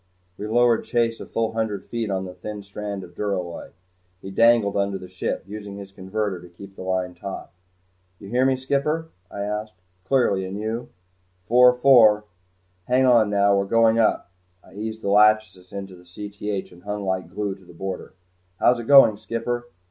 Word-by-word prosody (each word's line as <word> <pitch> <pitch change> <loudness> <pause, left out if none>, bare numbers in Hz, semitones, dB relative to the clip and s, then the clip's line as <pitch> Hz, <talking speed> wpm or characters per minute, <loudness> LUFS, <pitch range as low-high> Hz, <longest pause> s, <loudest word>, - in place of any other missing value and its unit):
We 105 - -6
lowered 120 +1 +3
Chase 115 -1 0
a - - -8
full 115 -1 -1
hundred 110 -3 -3
feet 115 -2 -3
on 95 -1 -2
the 90 - -8
thin 105 +3 -7
strand 100 0 -6
of 85 - -13
duralloy. 90 -4 -4 0.5
He 95 - -9
dangled 115 -1 +4
under 100 -1 0
the 90 - -10
ship, 90 0 -3
using 100 0 -8
his 100 -1 -9
converter 95 0 -3
to 90 - -13
keep 95 +3 -13
the - - -10
line 95 -1 -2
taut. 95 +2 -8 0.7
"You 100 - -12
hear 125 +5 +1
me, 130 0 +3
skipper?" 140 +5 -1 0.2
I 100 - -6
asked. 105 0 -4 0.3
"Clearly 110 -6 +2
and 95 +2 -5
you?" 110 +3 -4 0.5
"Four 125 +6 +6
four. 115 -5 +6 0.6
Hang 130 +1 +3
on 120 -4 +5
now 100 0 +3
we're 100 0 +1
going 115 +2 +3
up." 110 -5 +1 0.3
I - - -18
eased 110 +2 -6
the 100 - -1
"Lachesis" 105 -3 +3
into 100 -1 -7
Cth 100 +2 -6
and 90 0 -16
hung 105 +1 -4
like 95 -1 -2
glue 105 -2 -3
to 95 0 -16
the 90 - -15
border. 95 +2 -6 0.4
"How's 125 0 +4
it 120 - -6
going, 135 -7 +7
skipper?" 115 +2 -3
105 Hz, 180 wpm, -23 LUFS, 95-115 Hz, 0.7 s, going